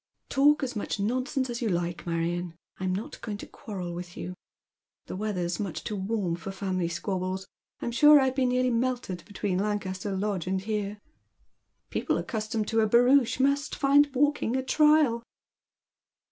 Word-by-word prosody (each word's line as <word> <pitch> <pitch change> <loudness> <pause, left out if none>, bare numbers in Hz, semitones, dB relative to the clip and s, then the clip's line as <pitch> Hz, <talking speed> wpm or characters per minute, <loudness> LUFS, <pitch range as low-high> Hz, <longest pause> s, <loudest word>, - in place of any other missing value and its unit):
" - - -49
Talk 290 +2 +4
as 260 -1 -3
much 210 0 -3
nonsense 255 +5 0
as 240 0 -4
you 230 - 0
like, 175 -1 -2
Marion, 170 +1 -2 0.2
I'm 185 0 -1
not 195 +4 -4
going 210 -2 -4
to - - -8
quarrel 185 -5 -7
with 175 +1 -7
you. 180 - -5 0.7
The - - -6
weather's 185 -4 -2
much 200 -5 -4
too 210 - -3
warm 195 -3 -1
for 195 - -6
family 190 -2 -2
squabbles. 185 +2 -3 0.3
I'm 235 - -2
sure 295 +4 +7
I've 265 -1 +2
been 260 -2 +1
nearly 250 0 +2
melted 240 -7 -1
between 205 -3 -2
Lancaster 200 -1 -2
Lodge 195 -3 -2
and 190 0 0
here." 210 0 -3 0.5
" - - -50
People - - 0
accustomed 215 -1 -2
to 225 - +2
a 220 - +4
barouche 245 +3 +4
must 280 +2 +1
find 285 +1 +4
walking 290 -3 +2
a 260 - 0
trial." 300 -4 +4
210 Hz, 170 wpm, -28 LUFS, 185-255 Hz, 0.7 s, sure